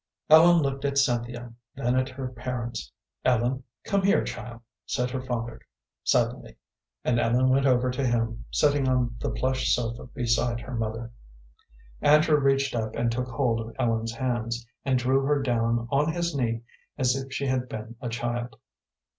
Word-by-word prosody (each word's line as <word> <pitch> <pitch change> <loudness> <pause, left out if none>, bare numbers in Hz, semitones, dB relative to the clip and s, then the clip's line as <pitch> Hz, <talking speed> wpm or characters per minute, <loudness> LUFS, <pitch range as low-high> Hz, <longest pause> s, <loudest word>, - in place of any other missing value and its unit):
Ellen 165 +1 +8
looked 135 0 -2
at 140 -1 0
Cynthia, 120 -2 0 0.2
then 125 -2 0
at 130 0 +1
her 130 0 -5
parents. 120 - -5 0.3
"Ellen, 125 +1 +2 0.2
come 200 -1 +1
here, 200 +2 +3
child," 120 -1 -7 0.3
said 125 -1 -1
her 130 0 -3
father, 120 -2 -4 0.4
suddenly, - - 0 0.5
and 120 -1 +2
Ellen 125 +3 +3
went 135 +1 +3
over 125 0 +3
to 125 +2 -2
him, 115 -1 -1
sitting 145 -2 +2
on 125 -2 +1
the - - -2
plush 130 0 0
sofa 115 -1 -4
beside 120 -1 0
her 130 - -8
mother. 115 0 -3 0.9
Andrew 150 +1 +5
reached 135 -1 +2
up 110 -1 -2
and 115 0 +1
took 125 +2 -2
hold 120 -2 0
of 115 0 -8
Ellen's 115 -2 0
hands, 120 -2 -2 0.2
and 130 -2 +2
drew 130 +2 +2
her 145 +1 +2
down 115 -3 0
on 145 +3 +2
his 170 0 -1
knee 115 -3 -1 0.3
as 130 -2 +2
if 135 0 -5
she 140 +1 -2
had 130 -1 -1
been 110 +1 -7
a 125 - -3
child. 120 +1 -3
125 Hz, 165 wpm, -26 LUFS, 115-135 Hz, 0.9 s, Ellen